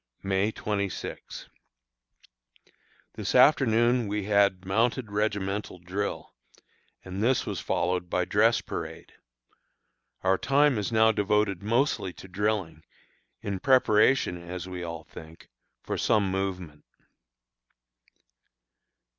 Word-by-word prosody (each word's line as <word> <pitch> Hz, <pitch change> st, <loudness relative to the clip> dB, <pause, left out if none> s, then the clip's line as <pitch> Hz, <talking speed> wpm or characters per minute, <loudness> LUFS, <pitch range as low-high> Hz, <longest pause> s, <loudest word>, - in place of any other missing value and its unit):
May 100 Hz, +2 st, +1 dB
26. 100 Hz, -4 st, -5 dB, 1.7 s
This -, -, -3 dB
afternoon 120 Hz, -4 st, +4 dB
we 105 Hz, 0 st, -2 dB
had 100 Hz, -2 st, +2 dB
mounted 115 Hz, +3 st, 0 dB
regimental 105 Hz, -2 st, -2 dB
drill, 90 Hz, +4 st, -4 dB, 0.7 s
and 95 Hz, +2 st, -5 dB
this 125 Hz, +3 st, +2 dB
was -, -, -4 dB
followed 90 Hz, 0 st, -1 dB
by 90 Hz, 0 st, 0 dB
dress 110 Hz, +5 st, +3 dB
parade. -, -, -7 dB, 1.1 s
Our 95 Hz, 0 st, +2 dB
time 140 Hz, -3 st, +3 dB
is 105 Hz, -, -3 dB
now 110 Hz, 0 st, +5 dB
devoted 105 Hz, -2 st, 0 dB
mostly 110 Hz, -3 st, 0 dB
to 95 Hz, -, -12 dB
drilling, 95 Hz, -5 st, -2 dB, 0.6 s
in 100 Hz, -2 st, -4 dB
preparation, 110 Hz, -6 st, +3 dB
as 90 Hz, +1 st, -7 dB
we 90 Hz, -1 st, -6 dB
all 85 Hz, -2 st, -6 dB
think, 80 Hz, +1 st, -13 dB, 0.3 s
for -, -, -3 dB
some 100 Hz, -3 st, +2 dB
movement. 90 Hz, -6 st, -4 dB
100 Hz, 105 wpm, -27 LUFS, 90-110 Hz, 1.7 s, now